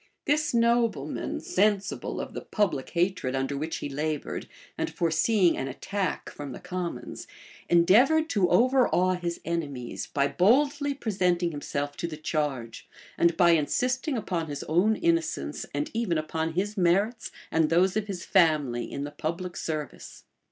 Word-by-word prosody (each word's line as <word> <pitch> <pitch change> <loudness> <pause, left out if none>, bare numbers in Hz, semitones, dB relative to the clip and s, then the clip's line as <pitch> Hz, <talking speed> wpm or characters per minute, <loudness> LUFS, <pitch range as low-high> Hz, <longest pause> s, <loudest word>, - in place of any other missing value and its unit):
This 300 +1 +1
nobleman, 230 - +1
sensible 200 0 0
of - - -5
the - - -5
public 170 - -1
hatred 175 -7 0
under 135 +1 -1
which 155 +3 -3
he - - -4
labored, 150 +1 -3 0.3
and - - -2
foreseeing 175 +3 +2
an 135 - -3
attack 195 +8 -3
from 145 -3 -7
the - - -8
commons 180 -1 -5 0.4
endeavored 240 - +5
to 190 -5 +2
overawe 235 -4 +3
his 175 -1 -3
enemies, 145 -8 -4
by 140 -1 +1
boldly 280 - +2
presenting 180 -8 0
himself 145 -1 -4
to 170 - -2
the 155 -2 -7
charge, 145 -7 -3 0.3
and 170 -1 +2
by 175 -1 +6
insisting 250 - +1
upon 175 -7 -2
his 145 -1 -5
own 180 +8 +2
innocence 165 - -1
and 145 +1 -3
even 220 -7 0
upon 160 +1 -2
his 200 +5 -1
merits, 200 +5 +1 0.2
and 160 -1 +2
those 180 +3 +3
of 215 -1 -1
his 185 -4 -5
family, 150 -9 +2
in 140 - -4
the 145 - -5
public 170 +4 -4
service. 155 -3 -5
170 Hz, 150 wpm, -27 LUFS, 150-205 Hz, 0.4 s, by